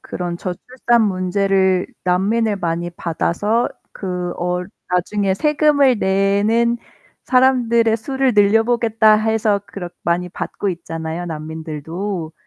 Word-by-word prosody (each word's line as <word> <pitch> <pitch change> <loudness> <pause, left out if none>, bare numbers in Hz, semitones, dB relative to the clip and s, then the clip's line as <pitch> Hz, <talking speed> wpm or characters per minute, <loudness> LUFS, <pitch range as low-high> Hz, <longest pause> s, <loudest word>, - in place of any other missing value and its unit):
그런 175 -1 -5
저출산 235 +6 0
문제를 190 -1 +1 0.2
난민을 205 +4 +1
많이 170 -1 -2
받아서 180 +7 -1 0.2
그 180 -2 -4
어 180 +1 -1 0.3
'나중에 190 +2 0
세금을 285 -1 +3
내는 205 +5 +2 0.5
사람들의 240 -3 +3
수를 265 +2 0
늘려보겠다.' 225 +1 +4
해서 215 -1 +1
그렇 175 -3 -7
많이 175 +1 0
받고 200 - -4
있잖아요 165 0 -5
난민들도. 160 +3 -5
195 Hz, 255 characters per minute, -19 LUFS, 175-225 Hz, 0.5 s, 늘려보겠다